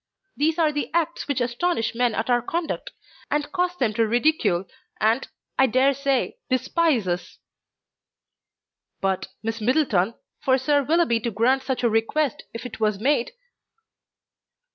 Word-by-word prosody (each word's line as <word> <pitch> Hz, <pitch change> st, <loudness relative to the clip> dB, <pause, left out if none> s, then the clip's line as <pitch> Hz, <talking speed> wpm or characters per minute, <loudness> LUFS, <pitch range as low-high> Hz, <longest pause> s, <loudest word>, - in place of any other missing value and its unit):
These 315 Hz, +3 st, +1 dB
are 320 Hz, -3 st, +3 dB
the 290 Hz, -1 st, -3 dB
acts 335 Hz, 0 st, 0 dB
which 285 Hz, -3 st, 0 dB
astonish 245 Hz, +1 st, 0 dB
men 240 Hz, -1 st, +1 dB
at 225 Hz, -, -1 dB
our 245 Hz, -1 st, +3 dB
conduct, 330 Hz, +7 st, -3 dB, 0.4 s
and 295 Hz, 0 st, -1 dB
cause 360 Hz, -1 st, 0 dB
them 235 Hz, -8 st, +1 dB
to 225 Hz, +1 st, +2 dB
ridicule 225 Hz, -, +2 dB, 0.3 s
and, 225 Hz, +5 st, +2 dB, 0.3 s
I 265 Hz, -, +6 dB
dare 260 Hz, +3 st, +3 dB
say, 275 Hz, -1 st, -1 dB
despise 260 Hz, -, +1 dB
us." 175 Hz, 0 st, -3 dB, 1.6 s
"But, 190 Hz, -1 st, -1 dB, 0.2 s
Miss 225 Hz, 0 st, -3 dB
Middleton, 230 Hz, -, +2 dB, 0.2 s
for 260 Hz, -1 st, +3 dB
Sir 285 Hz, +2 st, +2 dB
Willoughby 310 Hz, -4 st, +2 dB
to 235 Hz, -, -2 dB
grant 235 Hz, +5 st, +2 dB
such 265 Hz, -1 st, -3 dB
a -, -, +5 dB
request, 230 Hz, +5 st, 0 dB
if 230 Hz, -, -6 dB
it 245 Hz, -, -7 dB
was 215 Hz, -2 st, +1 dB
made 265 Hz, -, +1 dB
255 Hz, 145 wpm, -24 LUFS, 225-295 Hz, 1.6 s, I